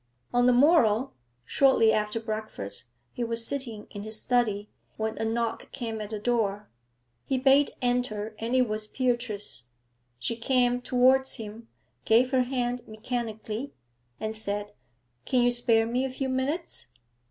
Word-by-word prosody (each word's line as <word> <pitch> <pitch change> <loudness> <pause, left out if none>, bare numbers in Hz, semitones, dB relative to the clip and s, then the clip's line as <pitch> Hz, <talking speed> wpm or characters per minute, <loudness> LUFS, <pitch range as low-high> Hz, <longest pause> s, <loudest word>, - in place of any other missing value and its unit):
On 245 0 +4
the - - +7
morrow, 250 -3 +4 0.3
shortly 265 - +4
after 210 +1 0
breakfast, 215 - -5 0.3
he 245 - -3
was 230 0 -2
sitting 235 -7 -4
in 205 - -6
his 215 +1 -4
study, 215 -5 +1 0.3
when 220 0 -2
a - - -1
knock 230 0 -2
came 225 -4 -4
at 210 - -5
the 215 - -3
door. 210 -2 0 0.6
He 265 - -1
bade 275 +2 +5
enter, 235 -4 0
and 230 +3 -1
it 255 -1 +4
was 215 0 -2
Beatrice. 235 - -2 0.5
She 230 - -2
came 245 +1 +2
towards 260 +2 +3
him, 225 0 -8 0.4
gave 245 +4 +4
her 260 -2 +4
hand 245 -1 -1
mechanically, 220 +2 -4 0.5
and 215 0 -3
said 205 -1 -3 0.5
'Can 250 -2 +3
you 245 - +4
spare 230 -2 +3
me 245 +3 0
a 265 - -1
few 265 +1 -3
minutes?' 275 +7 -2
235 Hz, 150 wpm, -27 LUFS, 215-250 Hz, 0.6 s, the